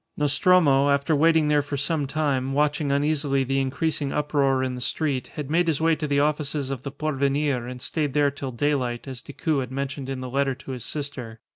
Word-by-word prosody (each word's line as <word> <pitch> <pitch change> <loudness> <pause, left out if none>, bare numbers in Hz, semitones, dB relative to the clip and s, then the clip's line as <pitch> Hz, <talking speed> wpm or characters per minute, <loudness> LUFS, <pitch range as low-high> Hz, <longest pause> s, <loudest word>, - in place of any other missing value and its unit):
Nostromo, 145 -1 +4
after 140 +2 +2
waiting 160 +1 +4
there 150 -1 +3
for 145 0 -4
some 145 0 0
time, 135 -3 -1
watching 150 0 +1
uneasily 140 -1 +1
the 135 +1 0
increasing 140 +1 -1
uproar 140 -3 +1
in 130 -1 -2
the 125 - -6
street, 135 0 -1
had 150 -1 -5
made 170 +1 +2
his 155 -4 +1
way 165 0 +3
to 155 -1 -3
the 140 -1 +2
offices 145 -2 0
of 135 -3 -4
the 140 - -5
Porvenir, 140 -3 -1
and 125 0 -7
stayed 145 +1 -2
there 145 -1 +3
till 135 -1 -6
daylight, 125 -2 -1
as 130 -2 -7
Decoud 145 +2 -2
had 130 -1 -4
mentioned 135 0 -4
in 135 -1 -3
the 130 - -5
letter 135 0 +1
to 130 +1 -9
his 125 -3 -5
sister. 130 -7 -5
140 Hz, 210 wpm, -24 LUFS, 135-150 Hz, -, Nostromo